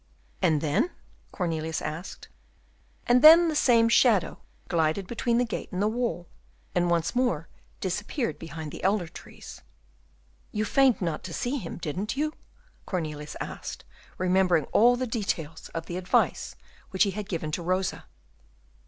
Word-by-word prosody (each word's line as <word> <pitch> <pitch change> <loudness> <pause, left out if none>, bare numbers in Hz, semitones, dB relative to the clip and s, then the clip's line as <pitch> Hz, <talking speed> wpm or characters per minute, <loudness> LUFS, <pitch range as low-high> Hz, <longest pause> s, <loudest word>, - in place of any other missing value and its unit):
"And 155 -3 +3
then?" 175 - +1 0.4
Cornelius 160 -3 -2
asked. 155 +5 -6 0.8
"And 245 +1 +4
then 330 +3 +9
the 310 - -2
same 235 -5 +4
shadow 230 -5 +3 0.3
glided 165 +2 +1
between 235 +3 0
the 245 - +2
gate 230 - -5
and 185 - -3
the 205 - +2
wall, 225 -6 -2 0.5
and 175 -1 +1
once 170 +3 0
more 185 -11 0 0.3
disappeared 210 - -2
behind 160 -1 -7
the - - -9
elder 195 -2 +1
trees." 170 - -12 0.9
"You 215 0 -1
feigned 255 0 +3
not 165 -3 -2
to 170 - -5
see 250 +4 -1
him, 165 - -7
didn't 185 - -4
you?" 305 +1 0 0.5
Cornelius 150 -5 -4
asked, - - -6 0.3
remembering 180 -4 +2
all 240 +3 +5
the 255 +1 -2
details 195 -9 -3
of 165 0 -3
the 175 - -5
advice 185 0 0 0.3
which 190 0 +3
he 200 - +1
had 210 +1 -6
given 160 -4 -3
to 170 - -2
Rosa. 185 +2 -1
185 Hz, 150 wpm, -27 LUFS, 165-235 Hz, 0.9 s, then